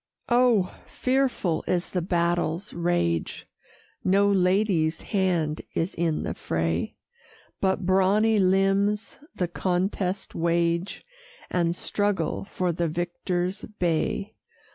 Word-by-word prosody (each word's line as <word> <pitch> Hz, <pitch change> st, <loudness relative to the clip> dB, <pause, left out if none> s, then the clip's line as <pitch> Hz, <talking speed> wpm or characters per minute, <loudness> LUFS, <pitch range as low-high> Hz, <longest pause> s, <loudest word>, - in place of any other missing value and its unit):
Oh! 240 Hz, -6 st, +3 dB
fearful 255 Hz, -10 st, 0 dB
is 175 Hz, -1 st, 0 dB
the 180 Hz, -, 0 dB
battle's 170 Hz, +1 st, 0 dB
rage; 170 Hz, -, -1 dB, 0.6 s
No 195 Hz, +2 st, +4 dB
lady's 185 Hz, -4 st, +2 dB
hand 175 Hz, -7 st, 0 dB
is 165 Hz, +4 st, -1 dB
in 165 Hz, -2 st, 0 dB
the -, -, -2 dB
fray; 80 Hz, +1 st, -2 dB, 0.6 s
But 190 Hz, -1 st, 0 dB
brawny 200 Hz, +4 st, +3 dB
limbs 195 Hz, +2 st, +2 dB, 0.2 s
the 180 Hz, -, 0 dB
contest 185 Hz, +2 st, -1 dB
wage, 170 Hz, -, 0 dB, 0.5 s
And 170 Hz, -1 st, +1 dB
struggle 200 Hz, -5 st, -1 dB
for 185 Hz, -3 st, -1 dB
the 170 Hz, 0 st, -1 dB
victor's 175 Hz, +3 st, -2 dB, 0.2 s
bay. 180 Hz, +4 st, 0 dB
180 Hz, 100 wpm, -26 LUFS, 170-195 Hz, 0.6 s, No